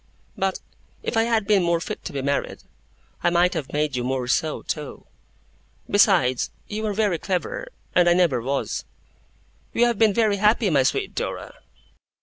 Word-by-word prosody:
But 190 Hz, 0 st, -1 dB, 0.4 s
if -, -, -3 dB
I 225 Hz, 0 st, +3 dB
had 225 Hz, -3 st, +1 dB
been 200 Hz, -2 st, +4 dB
more 170 Hz, -1 st, +1 dB
fit -, -, -6 dB
to -, -, -4 dB
be 135 Hz, -1 st, -4 dB
married 140 Hz, +1 st, -2 dB, 0.6 s
I 175 Hz, -, +3 dB
might 175 Hz, +2 st, +3 dB
have 155 Hz, -6 st, -4 dB
made 150 Hz, -2 st, 0 dB
you 125 Hz, -, -1 dB
more 130 Hz, 0 st, -2 dB
so, 155 Hz, +5 st, 0 dB
too. 150 Hz, -3 st, -5 dB, 0.8 s
Besides, 180 Hz, -, +3 dB, 0.2 s
you 215 Hz, +1 st, -4 dB
are 210 Hz, -, -1 dB
very 205 Hz, -6 st, +1 dB
clever, -, -, -3 dB, 0.3 s
and 175 Hz, -1 st, +5 dB
I -, -, +6 dB
never 165 Hz, -9 st, +2 dB
was.' 135 Hz, +3 st, -2 dB, 0.9 s
'We 240 Hz, -, +4 dB
have 240 Hz, -3 st, +2 dB
been 220 Hz, -2 st, +5 dB
very 215 Hz, -3 st, +2 dB
happy, 210 Hz, 0 st, +3 dB
my 140 Hz, -3 st, +4 dB
sweet 130 Hz, -, 0 dB
Dora. -, -, -4 dB
175 Hz, 170 wpm, -23 LUFS, 140-210 Hz, 0.9 s, I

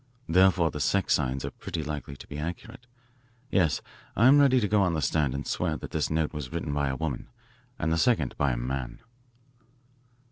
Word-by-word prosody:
Therefore 90 Hz, -2 st, +4 dB
the 75 Hz, -, -6 dB
sex 95 Hz, +5 st, +2 dB
signs 65 Hz, -2 st, 0 dB
are -, -, -4 dB
pretty 80 Hz, -2 st, -5 dB
likely 75 Hz, -2 st, -5 dB
to -, -, -12 dB
be 75 Hz, -, -7 dB
accurate. 115 Hz, +10 st, -7 dB, 0.6 s
Yes, 85 Hz, -6 st, +2 dB, 0.3 s
I'm 130 Hz, +6 st, +6 dB
ready 135 Hz, -3 st, +5 dB
to 105 Hz, -, 0 dB
go 105 Hz, 0 st, +3 dB
on 90 Hz, -3 st, +2 dB
the -, -, 0 dB
stand 70 Hz, 0 st, +1 dB
and 70 Hz, -, -4 dB
swear -, -, -1 dB
that -, -, -9 dB
this -, -, -1 dB
note 80 Hz, 0 st, 0 dB
was 75 Hz, -3 st, -6 dB
written 80 Hz, -3 st, -3 dB
by 70 Hz, -1 st, 0 dB
a 65 Hz, -, -2 dB
woman 75 Hz, -3 st, -4 dB, 0.5 s
and 80 Hz, +1 st, 0 dB
the 80 Hz, -, +1 dB
second 95 Hz, -, +2 dB
by 70 Hz, -2 st, +1 dB
a -, -, -3 dB
man." 60 Hz, 0 st, -4 dB
80 Hz, 200 wpm, -27 LUFS, 70-95 Hz, 0.6 s, I'm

